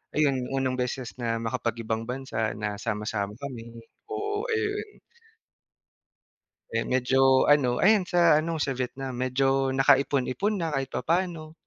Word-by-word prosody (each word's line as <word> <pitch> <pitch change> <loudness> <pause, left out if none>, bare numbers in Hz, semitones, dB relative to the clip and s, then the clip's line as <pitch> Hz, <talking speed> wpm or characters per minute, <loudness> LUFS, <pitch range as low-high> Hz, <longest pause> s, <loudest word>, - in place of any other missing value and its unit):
ayun, 135 -4 +1
unang 130 -1 -1
beses 125 -1 -3
na 115 -1 -1
makapag-ibang 115 0 -2
bansa 125 -4 -3
na 105 -1 -4
sama-sama 105 -1 -3
kami. 115 -3 -8 0.2
Oo, 415 +2 -3
ayun. 430 -2 -2 1.7
Eh, - - +1
medyo 130 +1 +4
ano, 135 -4 +4
ayan, 200 -2 +4
sa 170 -3 +5
ano, 165 +1 -3
sa 140 -3 -1
Vietnam. 130 +1 -4
Medyo 135 +1 +1
nakaipon-ipon 140 - +2
na 165 -3 -2
kahit 135 -2 -1
papaano. 165 +2 -2
135 Hz, 125 wpm, -27 LUFS, 120-160 Hz, 1.7 s, sa